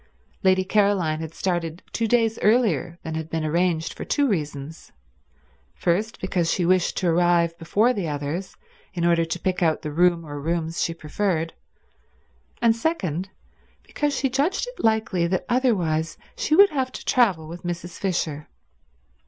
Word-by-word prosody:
Lady 185 0 +3
Caroline 190 -6 +2
had 160 -1 -5
started 175 -1 -2
two 230 - -1
days 225 -1 +2
earlier 200 - +2
than 160 - -5
had 160 0 -4
been 160 -1 -2
arranged 165 0 0
for - - -7
two 285 -1 +1
reasons: 150 - -4 0.8
first, 205 +6 -1
because 180 -3 0
she 180 - +1
wished 185 0 +2
to 185 - 0
arrive 170 0 +3
before 215 +9 +2
the 195 -8 -3
others 150 +5 -4 0.4
in 170 -1 0
order 170 -1 +3
to 165 +1 -3
pick 185 0 -1
out 160 -2 +1
the 150 - -4
room 170 +1 +2
or 145 -1 -6
rooms 165 +1 -2
she - - +1
preferred, 165 +1 -2 1.1
and 230 -1 +5
second, 195 - -2 0.5
because 295 -1 -1
she 270 - +1
judged 280 - 0
it - - -9
likely 220 -6 +2
that 185 +1 -1
otherwise 175 -11 +1 0.2
she 310 - +1
would 400 +1 +7
have 260 -3 -1
to - - -9
travel 195 -11 +2
with 170 +2 -8
Mrs. 175 0 -5
Fisher. 160 -6 -2
175 Hz, 160 wpm, -24 LUFS, 160-215 Hz, 1.1 s, would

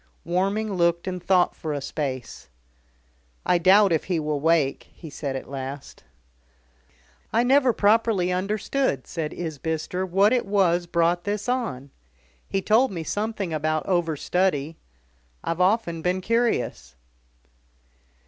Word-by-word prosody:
Warming 195 +5 0
looked 170 -1 +1
and 180 -1 -3
thought 180 -1 +3
for 155 -2 -4
a 145 - -2
space. 130 - -5 1.0
"I 180 - +3
doubt 195 +3 +5
if 160 - +1
he 180 -3 0
will 150 -1 -2
wake," 155 -3 +1
he 160 -4 -10
said 140 -2 -4
at 135 - -6
last. 135 +1 -7 1.3
"I 230 +2 +3
never 260 0 +4
properly 210 -4 +2
understood," 195 - -1
said 160 -3 -4
Isbister, 160 +2 -3
"what 195 +5 +3
it 245 -4 0
was 180 -4 +2
brought 170 +1 +1
this 205 +2 -3
on. 140 - -2 0.6
He 195 -1 -1
told 230 +5 +4
me 170 -4 -4
something 205 -1 -3
about 155 0 -1
overstudy. 165 -2 0 0.7
I've 165 +2 -2
often 180 -4 +1
been 180 +2 0
curious." 220 - -1
175 Hz, 130 wpm, -24 LUFS, 155-205 Hz, 1.3 s, doubt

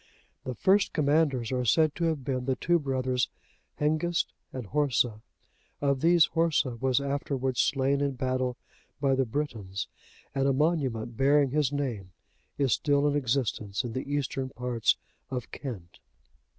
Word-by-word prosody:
The 130 - -4
first 195 - +3
commanders 145 -5 +2
are 125 -1 0
said 155 +5 +3
to 170 - -1
have 160 -5 0
been 130 -2 -1
the 130 -1 +1
two 170 +4 +2
brothers 130 -3 0 0.5
Hengist 155 +3 +1 0.2
and 130 -3 -5
Horsa. 125 -4 +1 0.6
Of 140 -2 +1
these 170 0 +6
Horsa 160 -7 +1
was 130 +2 +2
afterwards 140 -2 -2
slain 140 +1 +2
in 140 -1 0
battle 130 -1 -1 0.4
by 140 -2 +2
the 135 0 +2
Britons,(88) 110 -8 -3 0.5
and 135 0 +1
a 135 - +3
monument, 130 -7 0
bearing 140 0 +4
his 145 -1 +1
name, 120 -10 -3 0.4
is 135 -3 +2
still 145 0 +2
in 145 - +1
existence 120 -6 -1
in 120 -2 -5
the 130 +3 -4
eastern 135 -2 -1
parts 125 -3 0 0.3
of 125 -2 -5
Kent. 100 -11 -7
135 Hz, 150 wpm, -28 LUFS, 125-145 Hz, 0.6 s, these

